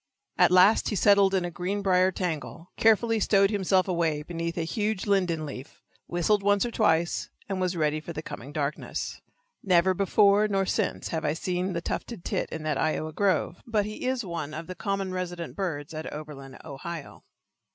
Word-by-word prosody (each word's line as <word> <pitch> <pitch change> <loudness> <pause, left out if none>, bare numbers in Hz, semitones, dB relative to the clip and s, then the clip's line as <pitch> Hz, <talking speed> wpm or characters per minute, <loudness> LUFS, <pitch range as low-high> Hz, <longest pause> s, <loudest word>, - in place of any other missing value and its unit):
At - - +5
last 185 +4 +5
he 210 - -2
settled 200 0 +5
in 185 -2 +1
a 175 - -4
green 190 +4 -3
briar 185 -1 +4
tangle, 170 -1 -4
carefully 225 +1 +3
stowed 195 -1 +3
himself 190 -2 +2
away 165 -4 0
beneath 170 +1 -4
a 165 - 0
huge 210 +2 -2
linden 180 -6 +1
leaf, 140 0 -9 0.2
whistled 185 +4 +1
once 205 +2 +3
or 240 - -3
twice, 170 -7 +1 0.2
and 195 -2 -2
was 180 -1 0
ready 155 -1 +1
for 160 - -8
the 155 -1 -6
coming 140 - -8
darkness. 150 0 -3 0.4
Never 185 -1 +3
before 200 +2 +4
nor 195 -2 +1
since - - -1
have 160 -1 -2
I 150 - +1
seen 180 +3 -2
the 170 - -2
tufted 200 +2 -5
tit - - -1
in 160 - -5
that 150 -3 -1
Iowa 155 0 -1
grove, 185 -2 0
but 215 -3 +1
he 215 +4 -5
is 255 -3 -1
one 160 -4 -5
of 160 +2 -6
the 185 - -6
common 195 +1 -2
resident 175 -2 -4
birds 160 -6 -3
at 155 0 -5
Oberlin, 145 -3 -8
Ohio. 160 +1 -8
180 Hz, 185 wpm, -27 LUFS, 160-200 Hz, 0.4 s, At